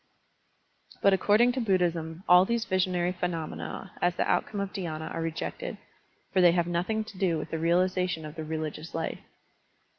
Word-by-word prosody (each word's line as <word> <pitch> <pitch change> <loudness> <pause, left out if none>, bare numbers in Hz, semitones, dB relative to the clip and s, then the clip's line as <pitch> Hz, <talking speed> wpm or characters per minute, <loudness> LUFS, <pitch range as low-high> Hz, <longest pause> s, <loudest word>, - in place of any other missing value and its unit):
But 200 - +6
according 210 +6 +4
to 255 +1 -2
Buddhism 175 -5 0
all 180 0 +8
these 235 +3 0
visionary 180 -2 +1
phenomena 175 +1 -4
as 175 0 +2
the - - 0
outcome 205 - 0
of 200 -1 -3
dhySna 160 -4 -4
are 165 - -3
rejected, 165 - -4 0.6
for 185 - +4
they 175 -1 +7
have 175 -1 +2
nothing 180 +6 -1
to 215 -3 -12
do 180 -5 +2
with 150 0 -6
the 160 - -2
realization 180 0 +1
of 150 - -7
the 160 -1 -6
religious 155 0 -5
life. 165 0 -3
180 Hz, 170 wpm, -28 LUFS, 165-190 Hz, 0.6 s, all